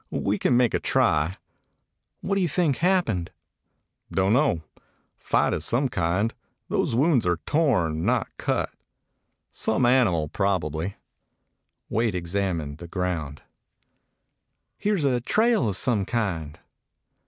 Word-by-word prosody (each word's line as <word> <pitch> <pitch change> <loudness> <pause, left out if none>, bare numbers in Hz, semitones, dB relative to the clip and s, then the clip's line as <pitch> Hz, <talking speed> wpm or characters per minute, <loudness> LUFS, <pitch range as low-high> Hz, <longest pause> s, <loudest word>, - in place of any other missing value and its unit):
We 100 +1 -1
can 125 - +3
make 125 -2 +3
a - - +2
try." 75 +5 +1 0.8
"What 200 - -2
do 195 - +1
you 180 - +2
think 160 -3 +1
happened?" 165 - +1 0.8
"Don't 95 +2 +2
know. 125 - +2 0.5
Fight - - +1
of - - -2
some 130 +3 +1
kind. 90 +3 0 0.4
Those - - 0
wounds 130 - +3
are 90 -1 +2
torn, 90 - +1
not 120 +1 +1
cut. - - -1 0.8
Some 110 +3 0
animal, 115 -11 +3
probably." 95 -1 -1 0.9
Wade 110 -2 0
examined 85 -4 -2
the 85 - -8
ground. 85 -5 -3 1.4
"Here 210 0 +1
's 155 - -1
a 125 -3 +1
trail 220 - +2
of 95 - -2
some 110 -6 +1
kind." 85 -10 -3
100 Hz, 125 wpm, -25 LUFS, 85-130 Hz, 1.4 s, can